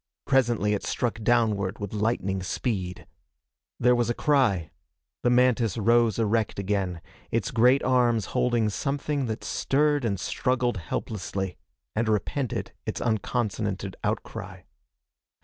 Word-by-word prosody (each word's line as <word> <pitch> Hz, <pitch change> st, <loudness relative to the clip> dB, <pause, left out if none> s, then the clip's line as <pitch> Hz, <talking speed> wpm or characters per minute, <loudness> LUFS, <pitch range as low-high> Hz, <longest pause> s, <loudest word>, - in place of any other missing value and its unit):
Presently 120 Hz, -6 st, +2 dB
it 105 Hz, -, -2 dB
struck 115 Hz, -2 st, -2 dB
downward 110 Hz, -4 st, +2 dB
with 105 Hz, -1 st, -6 dB
lightning 105 Hz, -3 st, 0 dB
speed. 95 Hz, -2 st, -3 dB, 0.7 s
There 125 Hz, +1 st, +5 dB
was 120 Hz, -1 st, +1 dB
a 120 Hz, -, 0 dB
cry. 115 Hz, -, +2 dB, 0.5 s
The 120 Hz, -, +2 dB
mantis 125 Hz, -4 st, +3 dB
rose 115 Hz, 0 st, +3 dB
erect 110 Hz, -1 st, +1 dB
again, 95 Hz, -3 st, -1 dB, 0.3 s
its 115 Hz, -4 st, -1 dB
great 125 Hz, +3 st, +4 dB
arms 120 Hz, -4 st, +3 dB
holding 120 Hz, -3 st, +2 dB
something 140 Hz, +4 st, -2 dB
that 110 Hz, 0 st, -4 dB
stirred 145 Hz, 0 st, +1 dB
and 100 Hz, -5 st, -1 dB
struggled 125 Hz, +1 st, 0 dB
helplessly, 95 Hz, +1 st, -4 dB, 0.4 s
and 110 Hz, 0 st, +1 dB
repented 110 Hz, +5 st, -1 dB
its -, -, -3 dB
unconsonanted 105 Hz, -4 st, -1 dB
outcry. -, -, -4 dB
115 Hz, 120 wpm, -26 LUFS, 100-125 Hz, 0.7 s, There